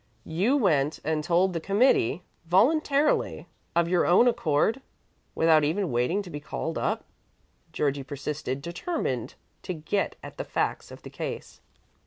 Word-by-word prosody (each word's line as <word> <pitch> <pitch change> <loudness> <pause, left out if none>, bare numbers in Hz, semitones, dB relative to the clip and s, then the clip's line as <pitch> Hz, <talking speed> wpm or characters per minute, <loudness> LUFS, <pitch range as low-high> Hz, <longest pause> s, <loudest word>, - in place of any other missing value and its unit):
"You 200 - +1
went 155 - +2
and 155 0 -1
told 180 +3 +2
the 165 - -1
committee 195 - +2 0.2
voluntarily, 280 - +2 0.3
of 170 0 +3
your 175 0 +2
own 185 +8 +6
accord, 230 - +1 0.5
without 160 -2 +4
even 165 +3 0
waiting 125 +12 +1
to 180 - -10
be 145 - -5
called 145 - -4
up?" - - -1 0.7
Georgie 140 -1 -1
persisted, 140 -1 -4
determined 170 - -3 0.3
to 185 - -4
get 165 +6 -2
at - - -10
the - - -1
facts - - -2
of - - -12
the - - -10
case. - - -6
170 Hz, 145 wpm, -27 LUFS, 150-205 Hz, 0.7 s, own